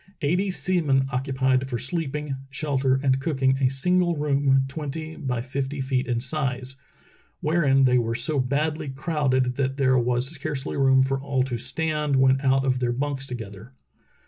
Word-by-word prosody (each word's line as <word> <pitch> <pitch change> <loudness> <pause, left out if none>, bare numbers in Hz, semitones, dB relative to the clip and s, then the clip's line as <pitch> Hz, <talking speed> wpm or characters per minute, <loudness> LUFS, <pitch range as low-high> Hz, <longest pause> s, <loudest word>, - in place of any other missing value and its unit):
Eighty 180 +7 +1
sea 185 -1 0
men 135 -3 +2
occupied 130 0 0
for 120 - -2
sleeping, 150 +2 -3
shelter, 135 -2 0
and 135 -1 +2
cooking 135 -2 +1
a 130 -2 +3
single 175 +5 +2
room 140 -2 +2
twenty 155 +2 -6
by 125 -3 -3
fifty 135 +2 -4
feet 130 -1 -1
in 120 -2 0
size, 130 -1 -2 0.6
wherein 150 -4 +3
they 125 -1 +4
were 115 -1 -1
so 150 +4 0
badly 150 +4 -1
crowded 135 -3 0
that 135 0 -1
there 130 -2 +3
was 125 +2 +1
scarcely 145 -2 -4
room 135 -1 +4
for 135 0 -1
all 135 -2 0
to 125 -3 -3
stand 150 0 -1
when 130 0 +4
out 135 -1 +2
of 130 -1 +1
their 125 -1 0
bunks 135 +1 -3
together. 110 -1 -8
135 Hz, 165 wpm, -24 LUFS, 130-150 Hz, 0.6 s, they